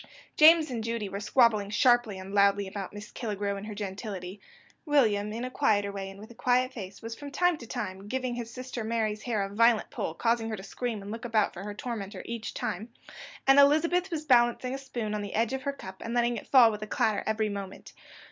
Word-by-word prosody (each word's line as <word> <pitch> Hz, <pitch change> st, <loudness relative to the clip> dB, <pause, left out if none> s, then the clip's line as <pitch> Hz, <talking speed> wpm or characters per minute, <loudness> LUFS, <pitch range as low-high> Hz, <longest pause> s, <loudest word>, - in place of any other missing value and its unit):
James 315 Hz, -1 st, +7 dB
and 230 Hz, -3 st, -3 dB
Judy 230 Hz, -2 st, -2 dB
were 200 Hz, -, -4 dB
squabbling 215 Hz, -2 st, +3 dB
sharply 240 Hz, -2 st, +3 dB
and 190 Hz, +1 st, -8 dB
loudly 200 Hz, 0 st, +4 dB
about 195 Hz, 0 st, -6 dB
Miss 205 Hz, 0 st, -10 dB
Killigrew 205 Hz, -3 st, -3 dB
and 200 Hz, +2 st, -7 dB
her 210 Hz, -, -6 dB
gentility; 195 Hz, -1 st, -6 dB, 0.4 s
William, 220 Hz, -, +2 dB
in 230 Hz, +3 st, -4 dB
a 255 Hz, -, -5 dB
quieter 205 Hz, -4 st, +1 dB
way, 195 Hz, -1 st, -5 dB
and 195 Hz, 0 st, -12 dB
with 215 Hz, +3 st, -11 dB
a -, -, -11 dB
quiet 255 Hz, +2 st, +1 dB
face, 195 Hz, -3 st, -8 dB
was, 230 Hz, 0 st, -5 dB
from 285 Hz, +5 st, -8 dB
time 355 Hz, +4 st, +2 dB
to 235 Hz, -, -11 dB
time, 200 Hz, -5 st, -5 dB
giving 255 Hz, +1 st, -2 dB
his 235 Hz, -1 st, -5 dB
sister 255 Hz, -1 st, -6 dB
Mary's 220 Hz, -1 st, -1 dB
hair 220 Hz, -4 st, -1 dB
a 195 Hz, -, -4 dB
violent 230 Hz, +2 st, +3 dB
pull, 160 Hz, -, -4 dB
causing 230 Hz, +1 st, 0 dB
her 220 Hz, -, -2 dB
to 190 Hz, -, -9 dB
scream 225 Hz, -1 st, -4 dB
and 200 Hz, -, -7 dB
look 225 Hz, +1 st, -6 dB
about 220 Hz, -3 st, +1 dB
her 190 Hz, -, -8 dB
for -, -, -7 dB
her 205 Hz, -, -6 dB
tormenter 205 Hz, -4 st, -5 dB
each 230 Hz, -2 st, -5 dB
time; 210 Hz, +6 st, -3 dB, 0.6 s
and 270 Hz, +1 st, +7 dB
Elizabeth 335 Hz, +6 st, +4 dB
was 315 Hz, -3 st, -4 dB
balancing 250 Hz, -1 st, +3 dB
a -, -, -2 dB
spoon 240 Hz, -5 st, -4 dB
on 210 Hz, -, -2 dB
the 205 Hz, -1 st, -5 dB
edge 230 Hz, +3 st, +1 dB
of 265 Hz, -, -2 dB
her 280 Hz, +1 st, -1 dB
cup, 190 Hz, -9 st, -10 dB
and 230 Hz, +1 st, -4 dB
letting 240 Hz, 0 st, +2 dB
it 220 Hz, -, -7 dB
fall 245 Hz, -4 st, +7 dB
with 210 Hz, -1 st, -6 dB
a 215 Hz, -, -5 dB
clatter 215 Hz, 0 st, +1 dB
every 220 Hz, 0 st, +1 dB
moment. 200 Hz, -2 st, -7 dB
225 Hz, 235 wpm, -28 LUFS, 205-245 Hz, 0.6 s, James